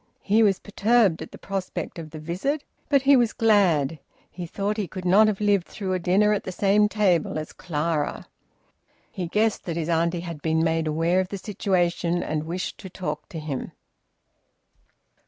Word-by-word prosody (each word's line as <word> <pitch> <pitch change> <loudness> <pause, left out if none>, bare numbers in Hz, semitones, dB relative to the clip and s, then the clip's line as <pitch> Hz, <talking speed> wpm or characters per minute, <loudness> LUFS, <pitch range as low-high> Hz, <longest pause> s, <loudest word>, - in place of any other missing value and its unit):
He 215 +3 +3
was 200 -4 +4
perturbed 210 -4 +2
at 160 - -8
the - - -10
prospect 190 -2 -5
of 160 -1 -8
the 155 - -9
visit. 185 - -2 0.3
But 280 -2 +3
he 280 +1 +6
was 240 -3 +3
glad; 175 - +3 0.3
he 175 -1 -6
thought 205 +5 -2
he 205 -4 -2
could 185 +2 -7
not 200 +4 +6
have 210 -2 0
lived 205 -4 +2
through 190 -2 -4
a 185 - 0
dinner 195 +5 +3
at 205 - -1
the - - -5
same 205 +3 +3
table 190 -8 +1
as 155 0 -5
Clara. 155 -2 -2 0.9
He 180 -2 -4
guessed 210 +4 +1
that 170 -2 -3
his 165 0 -2
auntie 170 +1 +1
had 170 -4 -7
been 160 +1 +1
made 165 -1 +1
aware 165 +4 +1
of 185 - 0
the 200 - -4
situation 175 -3 0
and 155 0 -2
wished 175 +3 -4
to 190 - -9
talk 150 -5 -5
to 165 - -7
him. 150 -4 -5
180 Hz, 185 wpm, -25 LUFS, 165-205 Hz, 0.9 s, he